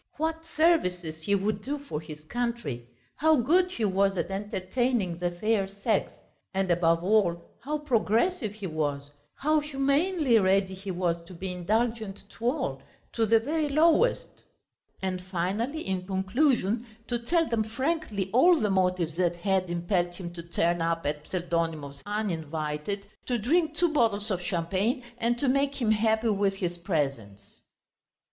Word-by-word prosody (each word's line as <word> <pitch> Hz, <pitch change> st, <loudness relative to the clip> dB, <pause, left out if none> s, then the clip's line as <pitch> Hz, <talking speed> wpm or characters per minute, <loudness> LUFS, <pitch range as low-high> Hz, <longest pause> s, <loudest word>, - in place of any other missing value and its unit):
What 320 Hz, +1 st, -1 dB, 0.2 s
services 180 Hz, -, +2 dB
he 200 Hz, +5 st, +1 dB
would 200 Hz, +1 st, -1 dB
do 280 Hz, +7 st, -3 dB
for 280 Hz, -, -5 dB
his 155 Hz, -1 st, -10 dB
country, 230 Hz, -, -3 dB, 0.3 s
how 315 Hz, +1 st, +5 dB
good 345 Hz, +8 st, +3 dB
he 235 Hz, -11 st, -2 dB
was 195 Hz, 0 st, +2 dB
at 175 Hz, -, -2 dB
entertaining 195 Hz, 0 st, -1 dB
the 175 Hz, 0 st, 0 dB
fair 195 Hz, +3 st, 0 dB
sex, 200 Hz, +2 st, -1 dB, 0.4 s
and 190 Hz, -2 st, +1 dB
above 165 Hz, -1 st, +3 dB
all, 180 Hz, -4 st, +2 dB, 0.2 s
how 300 Hz, +4 st, -1 dB
progressive 240 Hz, -, +1 dB
he 210 Hz, -1 st, -8 dB
was, 145 Hz, -4 st, -2 dB, 0.2 s
how 305 Hz, +2 st, +2 dB
humanely 290 Hz, -1 st, +2 dB
ready 190 Hz, 0 st, +2 dB
he 190 Hz, +1 st, -8 dB
was 175 Hz, -2 st, -1 dB
to 180 Hz, -, -11 dB
be 185 Hz, +2 st, -5 dB
indulgent 215 Hz, +3 st, -1 dB
to 230 Hz, -, -8 dB
all, 245 Hz, -, -1 dB, 0.3 s
to 225 Hz, -1 st, +1 dB
the 225 Hz, +1 st, +5 dB
very 300 Hz, +5 st, -1 dB
lowest; 330 Hz, -, +2 dB, 0.6 s
and 185 Hz, -1 st, -2 dB
finally 195 Hz, -, -2 dB
in 185 Hz, -1 st, -2 dB
conclusion 215 Hz, +3 st, +1 dB, 0.2 s
to 240 Hz, 0 st, -1 dB
tell 330 Hz, +7 st, +1 dB
them 230 Hz, -2 st, +1 dB
frankly 225 Hz, -, -2 dB
all 335 Hz, +7 st, +6 dB
the 210 Hz, -3 st, +1 dB
motives 180 Hz, -3 st, +1 dB
that 175 Hz, -1 st, +2 dB
had 185 Hz, 0 st, 0 dB
impelled 175 Hz, 0 st, 0 dB
him 175 Hz, -2 st, -7 dB
to 170 Hz, -, -6 dB
turn 170 Hz, 0 st, 0 dB
up 165 Hz, -1 st, 0 dB
at 150 Hz, +1 st, -2 dB
Pseldonimov's 165 Hz, -5 st, -2 dB
uninvited, 165 Hz, -2 st, -3 dB, 0.2 s
to 245 Hz, -, +1 dB
drink 315 Hz, -, +1 dB
two 340 Hz, -1 st, +2 dB
bottles 220 Hz, -6 st, +1 dB
of 180 Hz, -2 st, -1 dB
champagne 190 Hz, -, 0 dB, 0.2 s
and 235 Hz, +1 st, +1 dB
to 275 Hz, -, -1 dB
make 275 Hz, +2 st, +1 dB
him 225 Hz, -4 st, +2 dB
happy 220 Hz, +1 st, +2 dB
with 200 Hz, -1 st, +1 dB
his 175 Hz, -2 st, -3 dB
presence. 135 Hz, -, -3 dB
200 Hz, 155 wpm, -28 LUFS, 175-245 Hz, 0.6 s, all